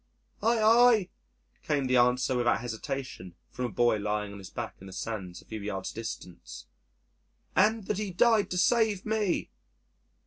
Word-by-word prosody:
"Aye, 230 +1 +3
aye," 225 -2 +5 0.5
came 145 -3 0
the 130 0 +2
answer 125 +1 +3
without 120 -1 +2
hesitation 115 -5 -6 0.2
from 125 - -3
a - - -2
boy 120 -2 +2
lying 105 0 -2
on 100 - -9
his 95 - -10
back - - -6
in 95 - -10
the 95 - -10
sands 95 -3 -5
a - - -29
few 110 -1 -7
yards 95 -2 -4
distant, 90 - -8 0.9
"and 215 +3 +3
that 210 0 -2
He 210 -2 -2
died 215 +3 +3
to 180 - -3
save 220 -1 +2
me." 215 -4 -1
125 Hz, 165 wpm, -29 LUFS, -, 0.9 s, aye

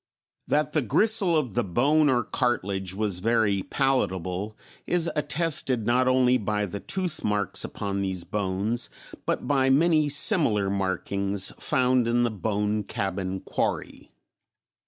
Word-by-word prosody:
That 150 0 0
the 155 - +2
gristle 190 - +3
of 130 -9 -2
the 120 - +1
bone 145 - +2
or 125 -3 +2
cartilage 100 -6 -2
was 100 -3 -1
very 110 -2 +1
palatable 100 - -1 0.3
is 170 -1 +1
attested 145 -6 0
not 125 +2 +2
only 130 0 +3
by 105 0 -1
the 100 +1 -6
toothmarks 105 - -1
upon 100 -1 -4
these 95 -2 -2
bones, 105 +4 -2 0.4
but - - -1
by 135 -2 +2
many 155 +2 +3
similar 140 - +3
markings 100 0 -1
found 125 -2 +1
in 120 +1 +2
the 120 - 0
Bone 105 0 -2
Cabin 95 -1 -4
Quarry. - - -3
115 Hz, 130 wpm, -25 LUFS, 100-135 Hz, 0.4 s, gristle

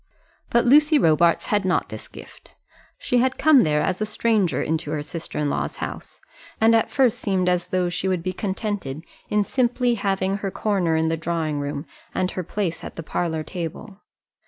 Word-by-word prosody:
But 235 - +3
Lucy 300 +4 +6
Robarts 170 - +3
had 205 -1 +1
not 185 -2 0
this - - -8
gift. - - -14 0.4
She 245 - +1
had 260 +1 +1
come 310 -4 +6
there 150 -1 +2
as 185 +2 -1
a - - +2
stranger 215 -4 +1
into 160 -1 -2
her 150 -1 -2
sister 165 +2 -7
in 150 - 0
law's - - -2
house, - - -7 0.4
and 225 0 +5
at 225 - +2
first 260 -5 +2
seemed 185 -2 0
as 180 -1 +1
though 185 -1 0
she 180 +2 -2
would 185 -3 0
be 185 +1 -2
contented 190 - -3 0.3
in 210 0 +2
simply 245 +1 +1
having 195 -2 0
her 195 -1 -3
corner 190 -5 0
in 160 0 +1
the 165 - 0
drawing 160 -2 -2
room 145 +1 -4 0.3
and 185 0 0
her 185 - -3
place 180 -1 -3
at - - -8
the 165 - -6
parlour 160 0 -2
table. 180 +5 -7
185 Hz, 190 wpm, -23 LUFS, 165-215 Hz, 0.4 s, Lucy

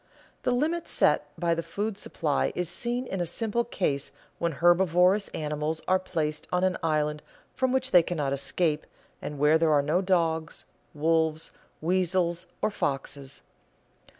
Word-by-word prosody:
The - - 0
limit 310 +7 0
set - - +2
by 170 -1 +2
the 165 - -1
food 205 +5 -3
supply 150 -6 -1
is 180 -2 -1
seen 240 +7 -1
in 190 -6 -3
a - - 0
simple 225 +6 0
case 150 - -1 0.3
when 170 -1 0
herbivorous 180 +4 +4
animals 150 +1 -3
are 185 0 +4
placed 155 -5 -3
on 180 0 +1
an 185 -1 +2
island 150 -2 0 0.3
from 260 -1 0
which 260 0 +1
they 180 - +8
cannot 150 -5 -2
escape, 150 +3 0 0.3
and 150 - -5
where 150 +3 +4
there 160 -1 +3
are 145 -1 +4
no 155 +6 +1
dogs, 165 -4 0 0.3
wolves, 160 +1 +1 0.3
weasels, 180 0 +1 0.2
or - - +2
foxes. 140 -5 -3
170 Hz, 150 wpm, -27 LUFS, 155-185 Hz, 0.3 s, they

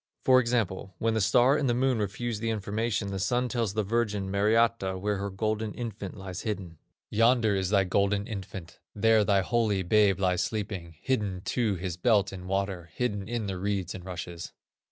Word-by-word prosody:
For 130 -1 +7
example, 110 -6 -1
when 115 0 0
the 110 - +1
Star 120 +6 +4
and 145 -4 +1
the 120 - +2
Moon 130 -1 +2
refuse 105 +2 -2
the 115 +1 -2
information, 110 0 -1
the 95 -1 -3
Sun 120 +6 0
tells 115 -5 -1
the 110 - +1
Virgin 105 -2 -1
Mariatta, 105 -1 +2
where 105 +2 -1
her 100 +1 -3
golden 110 +2 -2
infant 110 -4 -6
lies 95 -2 -6
hidden. 95 -7 -5 0.3
"Yonder 115 -1 +4
is 95 -2 0
thy 100 -1 +4
golden 100 +2 +1
infant, 95 -5 -7 0.2
There 110 0 +4
thy 100 -1 +3
holy 105 -2 +1
babe 100 0 +3
lies 90 -2 +2
sleeping, 95 -6 -4
Hidden 105 -8 -1
to 115 -5 0
his 90 -1 -4
belt 100 0 +2
in 90 -1 -8
water, 95 -3 -2
Hidden 105 -5 -2
in 120 -2 -2
the 95 -2 -4
reeds 95 -2 -2
and 90 - -8
rushes." 85 -2 -7
100 Hz, 185 wpm, -28 LUFS, 95-115 Hz, 0.3 s, For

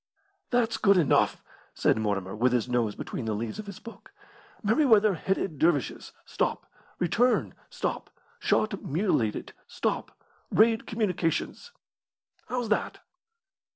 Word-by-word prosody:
"That's 240 -2 +1
good 200 -2 +4
enough," 160 -6 +2 0.3
said - - +3
Mortimer, 100 -3 -2
with 125 +3 +2
his 125 -1 +1
nose 120 -4 0
between 115 - -5
the 110 -1 -1
leaves 110 - -4
of 215 - -7
his 200 -2 -7
book. 230 - -12 0.5
"'Merryweather 215 -2 +4
headed 180 -3 -2
dervishes 160 -6 +1
stop - - -2 0.3
return 240 +8 +2 0.2
stop - - -3 0.3
shot 215 -3 0
mutilated 145 - -1
stop - - -2 0.4
raid 225 +1 +3
communications.' 215 - -1 0.8
How's 245 -3 -2
that?" 210 - -1
185 Hz, 120 wpm, -27 LUFS, -, 0.8 s, good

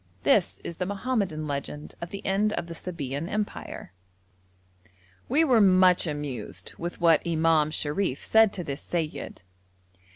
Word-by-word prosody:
This - - +3
is 170 - -6
the 180 - -2
Mohammedan 200 -7 -1
legend 145 +1 -5
of 170 - -5
the 200 - -8
end 205 +2 +1
of 175 - -2
the 170 - -7
Sabæan 165 -3 -5
Empire. 210 - -4 1.4
We 295 +6 +4
were 250 -8 +4
much 185 -2 +5
amused 130 - -3
with 170 +1 -5
what 165 -2 +5
Imam 160 -2 +2
Sharif 150 0 -1
said 220 -2 +5
to 180 - -4
this 140 -3 -5
seyyid. 160 - -4
170 Hz, 140 wpm, -27 LUFS, 150-195 Hz, 1.4 s, much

